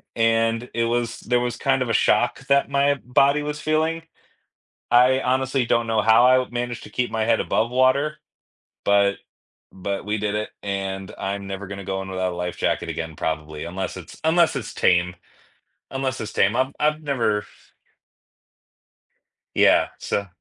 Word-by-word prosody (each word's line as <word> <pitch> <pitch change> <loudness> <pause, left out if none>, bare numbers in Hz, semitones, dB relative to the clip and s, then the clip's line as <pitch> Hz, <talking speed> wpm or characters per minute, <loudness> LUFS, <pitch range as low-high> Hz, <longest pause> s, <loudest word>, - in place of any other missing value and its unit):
and 115 +1 +1
it 115 0 +1
was, 115 0 -1
there 125 +1 +1
was 120 -1 -2
kind 135 -1 +1
of 125 - -1
a - - +1
shock 120 +5 +2
that 140 -1 +3
my 140 0 +2
body 140 +3 +3
was 150 0 -4
feeling. 160 +1 0 0.9
I 125 +2 +5
honestly 130 0 0
don't 115 0 +1
know 110 -1 +1
how 110 +2 +6
I 130 0 +4
managed 120 0 -4
to - - -12
keep 125 -2 -1
my 110 -1 0
head 115 0 +2
above 115 +2 0
water, 130 +4 +2 0.7
but 100 0 +3 0.6
but 95 +1 -4
we 105 +1 -1
did 105 0 -2
it, 105 0 -2
and 95 -1 -4
I'm 100 0 -4
never 100 +1 -5
gonna 100 0 -7
go 95 0 -2
in 95 - -7
without 95 -1 -2
a - - -7
life 90 0 -4
jacket - - -1
again, 80 -1 -5
probably, 80 0 -4
unless 95 +3 -4
it's 90 -2 -11
unless 160 0 +3
it's 115 -4 -6
tame 90 -2 +2 0.8
unless 135 -1 -2
it's 110 - -5
tame, 105 +3 +2
I've 130 +1 +1
I've 150 +1 +1
never 115 -8 0 2.1
Yeah, - - +4
so 100 0 -2
115 Hz, 170 wpm, -23 LUFS, 100-130 Hz, 2.1 s, how